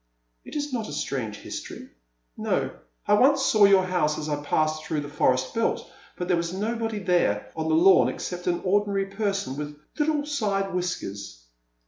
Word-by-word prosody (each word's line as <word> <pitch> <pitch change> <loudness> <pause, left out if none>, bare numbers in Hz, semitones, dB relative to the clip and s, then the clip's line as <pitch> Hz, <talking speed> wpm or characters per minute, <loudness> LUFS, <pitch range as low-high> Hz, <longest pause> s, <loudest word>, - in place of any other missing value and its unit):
It - - -11
is 295 -2 -3
not 225 -3 -2
a - - -6
strange 115 -6 -3
history, - - -8 0.3
— - - -48
no, - - -1 0.4
I - - +4
once 270 +5 +5
saw 215 -2 +6
your 195 -1 +6
house 175 -5 +1
as 155 0 -4
I 145 -1 -2
passed 155 +1 0
through 155 -1 -2
the 145 - -6
forest 130 -3 +1
belt, 230 0 0 0.3
but 180 - -3
there 180 -2 +2
was 170 0 -2
nobody 225 +2 -2
there 175 - +1
on 160 0 -2
the 160 - +3
lawn 185 +3 +6
except 180 0 -5
an 175 -1 +1
ordinary 200 +1 +1
person 195 -7 -2
with 150 0 -5 0.2
little 295 -1 +1
side 200 -9 -1
whiskers. 100 - -4
180 Hz, 180 wpm, -26 LUFS, 150-210 Hz, 0.4 s, saw